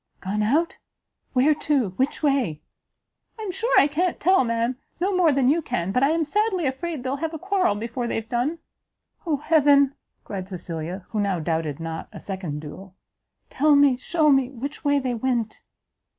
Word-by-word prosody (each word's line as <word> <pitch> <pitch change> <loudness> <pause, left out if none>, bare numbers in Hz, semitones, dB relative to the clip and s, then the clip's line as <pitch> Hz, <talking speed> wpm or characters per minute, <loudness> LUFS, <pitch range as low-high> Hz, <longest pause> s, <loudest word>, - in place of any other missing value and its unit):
"Gone 200 +3 -2
out? 300 - +1 0.5
where 265 +4 +4
to? 290 -7 0
which 260 +11 -2
way?" 265 - +1 0.8
"I 440 - -6
am 400 - -3
sure 460 +6 -2
I - - +6
can't 330 +5 -1
tell, 375 -1 +4
ma'am, 230 +1 -1 0.2
no 380 +2 0
more 350 -4 +4
than 270 -2 +2
you 315 +5 +3
can; 175 - -2
but 250 - +1
I 275 - +4
am 325 +1 +1
sadly 380 +1 0
afraid 285 +1 -3
they'll 265 +2 -2
have 325 +2 -3
a - - -3
quarrel 370 - +1
before 235 +3 -4
they've 225 -1 -3
done." 250 +8 -1 0.7
"Oh 305 -3 +1
heaven!" 285 -2 +4 0.3
cried 190 -2 -6
Cecilia, 175 0 -5
who 220 - -2
now 200 -3 0
doubted 160 -2 -2
not 165 0 -5
a - - -9
second 180 -7 -5
duel, 185 +5 -10 0.6
"tell 295 +1 +4
me, 285 -2 +5
shew 305 +4 +2
me, 270 -2 +3
which 275 +4 -7
way 285 -1 +3
they 260 -3 -1
went?" 235 -2 -2
265 Hz, 180 wpm, -24 LUFS, 205-310 Hz, 0.8 s, I